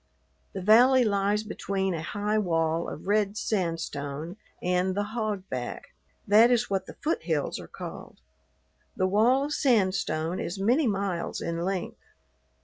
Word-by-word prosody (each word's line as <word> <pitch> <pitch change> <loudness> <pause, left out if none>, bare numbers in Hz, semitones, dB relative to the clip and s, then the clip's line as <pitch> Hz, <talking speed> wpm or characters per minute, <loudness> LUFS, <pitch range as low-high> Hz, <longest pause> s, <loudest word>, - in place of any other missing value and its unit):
The 190 - -5
valley 245 +5 +6
lies 205 0 +1
between 195 -3 -2
a 165 - -3
high 205 +6 -1
wall 165 -3 0
of - - -8
red 205 0 +1
sandstone 165 -5 -3 0.2
and 180 +1 0
the 205 0 -2
"hogback," 195 - -4 0.3
that 220 +4 +7
is 245 -3 +1
what 190 -1 -1
the - - -10
foothills 320 +3 -1
are - - -9
called. - - -9 0.8
The 185 - +2
wall 225 +8 +3
of 295 - -3
sandstone 185 - +1
is 175 - -4
many 245 +8 +3
miles 195 -4 -2
in 170 0 -3
length. 185 -1 -3
195 Hz, 140 wpm, -27 LUFS, 175-215 Hz, 0.8 s, that